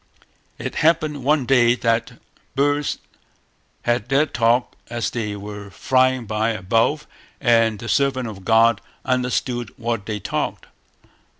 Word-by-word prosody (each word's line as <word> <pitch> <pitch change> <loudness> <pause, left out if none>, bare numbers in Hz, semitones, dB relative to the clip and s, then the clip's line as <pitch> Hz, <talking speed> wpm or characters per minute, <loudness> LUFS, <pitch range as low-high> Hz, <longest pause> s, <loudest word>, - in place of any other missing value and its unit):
It - - -5
happened 155 -3 +2
one 145 -1 +2
day 120 -2 +4
that 115 -2 0 0.4
birds 145 +1 +1 0.9
had 120 -1 0
their 140 +3 +4
talk 120 -3 +1
as 120 -1 -2
they 105 -4 -3
were 100 0 -8
flying 130 +2 +1
by 110 +2 0
above 115 +9 +1 0.3
and 115 -4 +3
the 115 - -8
servant 130 +1 +1
of 100 -4 -9
God 115 +1 +4 0.2
understood 125 -2 -1
what 115 -3 -3
they 105 -1 -3
talked. - - -3
120 Hz, 125 wpm, -21 LUFS, 110-130 Hz, 0.9 s, day